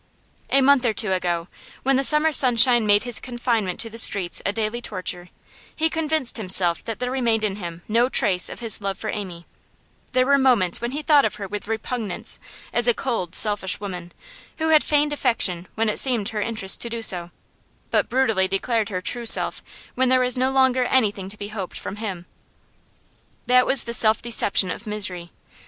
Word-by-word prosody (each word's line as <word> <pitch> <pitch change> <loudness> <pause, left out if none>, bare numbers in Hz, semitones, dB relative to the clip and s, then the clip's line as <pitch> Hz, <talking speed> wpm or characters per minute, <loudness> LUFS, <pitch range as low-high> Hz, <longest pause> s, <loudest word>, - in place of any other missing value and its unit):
A 275 - +3
month 275 -1 +3
or 235 -3 0
two 195 -3 +3
ago, 175 -2 -2 0.4
when 270 +1 +1
the 270 - +1
summer 300 +3 +4
sunshine 240 -3 +4
made 205 +1 +3
his 245 -2 +1
confinement 235 -7 -3
to 230 - -5
the 230 - -4
streets 190 -5 +3
a - - 0
daily 220 +2 -3
torture, 180 -4 -5 0.5
he 320 0 -1
convinced 315 -6 -1
himself 185 -5 0
that 225 - -5
there 250 0 -4
remained 235 -4 -1
in 205 -2 -2
him 170 -3 -8
no 235 +3 +1
trace 185 -7 0
of - - -10
his 225 -2 +1
love 195 -1 -4
for - - -5
Amy; 180 -5 -7 0.7
there 255 0 +2
were 280 +1 +3
moments 235 -10 +2
when 240 - -3
he 290 +4 -6
thought 295 -2 +4
of - - -2
her 200 - -7
with 205 +1 -7
repugnance, 225 -2 -4 0.3
as 240 0 +3
a 240 - +3
cold, 220 -10 -3
selfish 205 -3 +3
woman, 180 -4 -8 0.5
who 320 0 -2
had 310 -1 +4
feigned 295 0 +1
affection 195 -10 +1
when 225 0 -1
it 210 - -1
seemed 240 -6 +2
her 215 -2 -4
interest 215 -3 +1
to 235 - +2
do 230 0 -4
so, 175 -4 +4 0.6
but - - 0
brutally 225 -7 +1
declared 220 +3 -2
her 185 -3 -4
true 235 +5 -3
self - - +4 0.3
when 260 0 0
there 255 0 +3
was 250 -1 -1
no 260 +1 0
longer 260 -1 +2
anything 205 -7 0
to 210 - -9
be 205 0 -7
hoped 200 -4 -7
from 200 - -7
him. 195 -5 -6 1.2
That 250 0 +3
was 270 - +3
the 235 - -6
self 220 -2 +3
deception 205 -5 +1
of 225 - -8
misery. 185 -5 -3
225 Hz, 195 wpm, -21 LUFS, 195-255 Hz, 1.2 s, summer